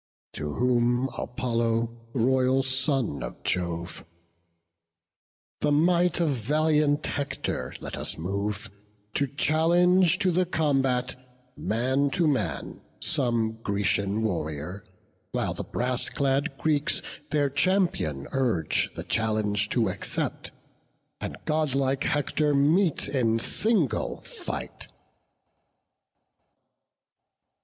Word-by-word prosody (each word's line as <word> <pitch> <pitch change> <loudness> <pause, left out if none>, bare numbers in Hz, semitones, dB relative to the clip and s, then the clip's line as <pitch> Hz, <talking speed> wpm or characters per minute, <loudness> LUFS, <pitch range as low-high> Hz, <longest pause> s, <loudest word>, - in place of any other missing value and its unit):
To 75 0 -3
whom 125 - +2
Apollo, 115 -2 -1 0.2
royal 130 +2 +3
son 130 - +1
of - - -7
Jove: 85 -1 -2 1.6
"The 150 - +1
might 175 +3 +3
of 165 -3 +2
valiant 150 +4 +2
Hector 140 -1 -3
let - - -5
us - - -1
move 100 +4 -2 0.4
To 140 - +1
challenge 170 +5 +3
to 185 0 +2
the 180 +1 +1
combat, 130 -4 -1
man 130 +5 +1
to 170 -3 +3
man, 105 - -2 0.2
Some 115 -6 +1
Grecian 100 0 0
warrior; 85 -1 -3 0.5
while - - 0
the - - -5
brass 125 +1 -2
clad 135 0 0
Greeks 150 -1 +1 0.3
Their 145 -2 +1
champion 145 - +1
urge 120 - +1
the - - -5
challenge 105 -2 0
to - - +2
accept, - - -3 0.7
And - - -5
godlike 140 -2 +1
Hector 150 0 +1
meet 155 +5 +3
in 115 -5 +1
single 180 - 0
fight." - - -6
130 Hz, 100 wpm, -27 LUFS, 110-150 Hz, 1.6 s, royal